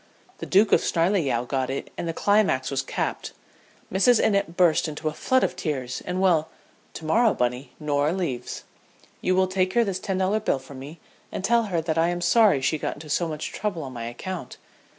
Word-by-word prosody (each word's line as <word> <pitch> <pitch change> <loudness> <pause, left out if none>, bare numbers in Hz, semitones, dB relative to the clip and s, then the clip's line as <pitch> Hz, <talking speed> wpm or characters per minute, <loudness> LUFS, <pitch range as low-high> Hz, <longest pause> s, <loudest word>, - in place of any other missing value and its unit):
The - - -6
Duke 200 +3 +4
of - - +5
Snarleyow 165 - +1
got 130 0 -1
it 135 - -4
and 170 - -4
the - - 0
climax 200 -10 +2
was 135 -1 0
capped. 135 - -3 0.6
Mrs. 215 +5 +4
Innitt 200 -5 +1
burst 175 -2 +4
into 155 +1 -5
a - - -7
flood 260 +10 +1
of - - 0
tears 130 -6 -3
and 180 +1 -2
well, 165 -5 +3 0.5
to 160 - -7
morrow, 225 +8 +3
Bunny, 125 +2 -2
Norah 145 0 +1
leaves. 170 -10 -3 0.6
You 185 - +1
will 190 0 +4
take 185 0 0
her 235 - +4
this 195 -4 -2
ten 190 -1 -2
dollar 190 +3 +1
bill 215 - 0
from 135 0 -11
me, 145 +5 -10 0.3
and - - -5
tell 235 +3 +3
her 175 -5 -1
that 160 0 -1
I 165 - +3
am 175 0 -2
sorry 175 - +4
she 150 +4 0
got - - -3
into 150 0 -9
so 170 +3 +1
much 155 -1 -5
trouble 200 -6 -3
on 130 -2 -7
my 115 -2 -5
account. 170 +10 -6
170 Hz, 210 wpm, -25 LUFS, 145-190 Hz, 0.6 s, of